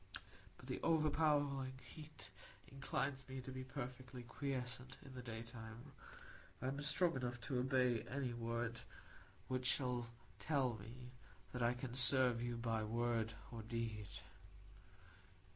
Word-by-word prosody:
But - - -12
the - - -2
overpowering 145 -4 +4
heat 155 +4 -9 0.4
inclines 135 0 0
me 130 0 -3
to 130 - -6
be 130 0 -3
perfectly 130 -1 -5
quiescent 130 0 -2
in 135 - -9
the 125 - -5
daytime. 115 +1 -6 0.7
I 130 - 0
am 140 +2 -2
strong 155 +3 +3
enough 125 -1 -1
to 125 +1 0
obey 125 -2 +4
any 130 -2 0
word 115 0 -1 0.7
which 130 -1 +1
shall 125 -3 +3 0.3
tell 135 +1 +3
me 125 +3 -8 0.4
that 125 - -1
I 120 +1 +4
can 120 0 -4
serve 125 -1 +5
you 120 0 0
by 115 -2 +1
word 115 0 +1 0.2
or 115 -2 -4
deed. 110 -2 -2
125 Hz, 130 wpm, -42 LUFS, 115-135 Hz, 0.7 s, serve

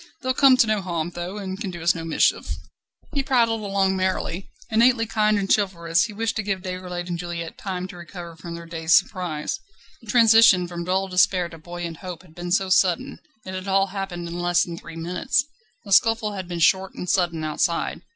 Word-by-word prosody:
They'll 255 0 +1
come 270 -1 +6
to 255 - +5
no 215 -2 0
harm, 170 -2 -3
though, 175 +3 -6
and 195 0 -5
can 200 - -3
do 175 -2 -7
us 170 - +4
no 165 - -6
mischief." 165 -1 +1 0.6
He 280 - +1
prattled 235 -4 +2
along 195 -1 +1
merrily. 185 -1 -2 0.2
Innately 230 +1 +4
kind 215 -1 +2
and 195 -1 -1
chivalrous, 175 -5 +2
he 220 - -7
wished 225 +2 -2
to - - +1
give 195 -2 -3
Déroulède 180 -1 -5
and 175 -1 -3
Juliette 170 -1 -6
time 185 -2 -4
to 180 - -10
recover 175 -1 -9
from 170 +1 -8
their 170 0 -9
dazed 165 -1 +2
surprise. 165 -5 0 0.4
The 225 - -15
transition 225 -5 +6
from 170 -1 -6
dull 190 +2 0
despair 180 -1 +2
to 165 - -12
buoyant 175 0 -6
hope 180 -2 -8
had 170 -4 -19
been 175 +1 -6
so 190 +1 +2
sudden: 185 -1 +2 0.3
it 185 - -6
had 185 +1 -5
all 195 0 +3
happened 185 -3 -4
in 170 +1 -5
less 175 0 +2
than 170 - -6
three 165 -1 -10
minutes. 180 +10 0 0.4
The 200 - -9
scuffle 225 +2 +4
had 190 -3 -6
been 175 -1 -4
short 190 +3 +2
and 180 - -6
sudden 170 -3 +1
outside. 155 +2 -1
185 Hz, 210 wpm, -23 LUFS, 170-200 Hz, 0.6 s, come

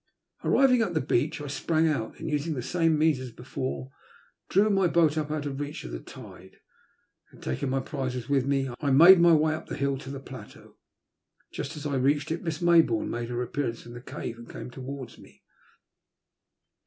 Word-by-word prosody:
Arriving 255 -3 +4
[at 190 -7 -1
the - - +3
beach 150 +3 0
I - - -5
sprang 155 +3 +1
out, 140 -8 -2
and, 160 - -5
using 150 +1 -1
the 125 - -4
same 165 +2 +1
means 155 -3 +3
as 130 -2 -7
before, 65 - -5 0.6
drew 200 +3 +4
my 195 -2 +3
boat 165 -3 +3
up 155 -1 -2
out 150 -1 -3
of 140 -1 -4
reach 145 +1 -5
of - - -7
the - - -5
tide. 95 +9 -13 0.8
Then, - - -17
taking 65 - -3
my 135 +1 0
prizes 130 -2 -4
with 140 -2 +1
me, 135 -1 +1
I 145 - -1
made 170 +7 +8
my 170 0 +6
way 155 0 +2
up 155 - -6
the - - -5
hill 140 -1 0
side - - -11
to - - -7
the 140 0 -5
plateau. 135 - -12 0.8
Just 155 +3 -5
as 150 - -8
I 140 -2 0
reached 145 +4 +1
it, 165 - -2
Miss 165 -2 -4
Mayboume 165 -10 +4
made 120 0 -4
her 120 0 -2
appearance 125 -3 -3
from 120 - -11
the 120 - -9
cave 120 -2 -7
and 120 - -12
came 115 +2 -8
towards 130 0 -8
me. - - -18
145 Hz, 205 wpm, -27 LUFS, 125-160 Hz, 0.8 s, made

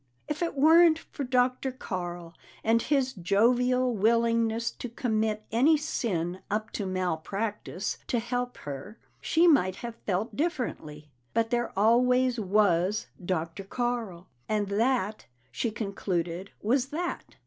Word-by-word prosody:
If 300 +2 -4
it 340 -3 -1
weren't 320 +3 +6
for 295 - -7
Dr. 255 +1 +1
Carl 175 -8 -5 0.3
and 230 +1 +3
his 270 -2 +1
jovial 245 +6 +2
willingness 230 +1 +2
to 245 - -7
commit 220 -2 -1
any 275 +8 +4
sin 185 - -2
up 215 +1 -2
to 200 - -3
malpractice 185 +3 -3
to 245 - 0
help 245 +1 -2
her, 145 - -7 0.2
she 330 +2 +3
might 185 - +4
have 235 +2 -7
felt 205 +3 -1
differently. 180 - -3 0.2
But 230 +1 +1
there 240 0 0
always 250 +3 +3
was 200 -1 +2
Dr. 170 0 -2
Carl, 225 -5 -3 0.2
and 210 -2 0
that, 215 0 0 0.2
she 235 - -1
concluded, 190 -4 -3
was 250 +4 +2
that. 335 +5 -4
225 Hz, 125 wpm, -28 LUFS, 190-250 Hz, 0.3 s, weren't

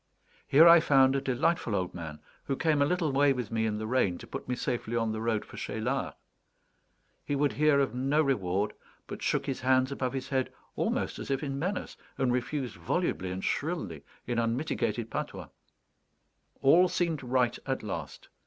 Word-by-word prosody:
Here 155 +5 +7
I 170 0 +9
found 135 -3 +4
a 135 - +1
delightful 130 -2 0
old 90 -2 -2
man, 80 -3 -7 0.2
who 135 - -1
came 155 0 +1
a 140 - +4
little 170 -3 0
way 140 +1 +4
with 125 -5 -4
me 110 0 +1
in 105 -1 -2
the 110 - -4
rain 110 -7 +1
to - - -10
put - - -7
me 125 - -1
safely 120 -2 -3
on 115 -1 +1
the 110 0 -4
road 110 -2 0
for - - -12
Cheylard. - - -2 1.1
He 145 - -2
would 145 0 +1
hear 150 -1 +4
of 135 -3 +1
no 135 +4 +1
reward, 100 -7 0 0.3
but - - -8
shook - - 0
his 135 - -3
hands 130 +1 +3
above 130 -2 -2
his 135 0 -4
head 130 -2 0 0.2
almost - - -1
as - - -7
if 135 +2 -1
in 140 -1 -3
menace, 185 +5 -3 0.2
and 125 -2 +1
refused 125 -3 -2
volubly 95 - -1
and 95 +1 -5
shrilly 140 - -2 0.2
in 120 -1 -1
unmitigated 115 -2 -1
patois. - - -5 1.1
All 170 +7 +6
seemed 170 -4 -1
right 125 -2 +1
at 135 -3 -2
last. 80 -9 -6
130 Hz, 185 wpm, -29 LUFS, 110-145 Hz, 1.1 s, I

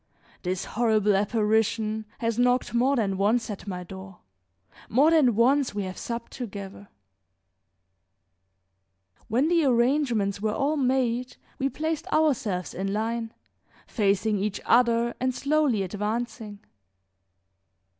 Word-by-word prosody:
this 185 +1 -3
horrible 215 -3 +2
apparition 215 +1 0
has 230 0 -2
knocked 245 0 +2
more 255 +4 +3
than 200 -6 0
once 220 +3 +1
at 205 0 -8
my 180 -2 -4
door; 190 +1 -10 0.7
more 280 +8 +4
than 280 -9 +4
once 255 +1 +2
we 205 - -1
have 185 0 -5
supped 235 +3 -6
together. 200 -4 -8 2.4
When 250 +7 +1
the 335 -1 +3
arrangements 240 -6 +1
were 215 0 -1
all 290 +3 0
made 255 -2 0 0.2
we 270 0 +1
placed 315 +2 -3
ourselves 235 - 0
in 195 +2 -3
line, 225 +2 -2 0.5
facing 205 -1 +1
each 205 0 -2
other 235 -1 +3
and 255 0 -1
slowly 280 -8 +1
advancing. 210 +1 -4
230 Hz, 115 wpm, -26 LUFS, 205-255 Hz, 2.4 s, more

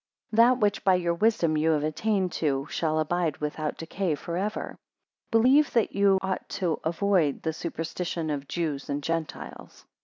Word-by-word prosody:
3 215 - -4
That 240 +2 +6
which 210 -4 +1
by 190 -1 +5
your 175 -1 0
wisdom 170 -4 +2
you 155 +1 +2
have 150 -1 0
attained 185 +4 0
to, 140 -4 -1
shall 155 -1 0
abide 160 -1 0
without 150 0 -3
decay 170 0 -2
for 170 +4 -6
ever. 205 +4 -3 0.5
4 225 - +5
Believe 275 +5 +4
that 230 -3 +2
you 200 -1 +4
ought 190 -1 -3
to 175 -5 -1
avoid 170 -3 +1
the 160 - -1
superstitions 165 0 -4
of 145 -1 -4
Jews 150 -3 -3
and 145 0 -2
Gentiles. 165 -1 -5
170 Hz, 175 wpm, -27 LUFS, 155-200 Hz, 0.5 s, That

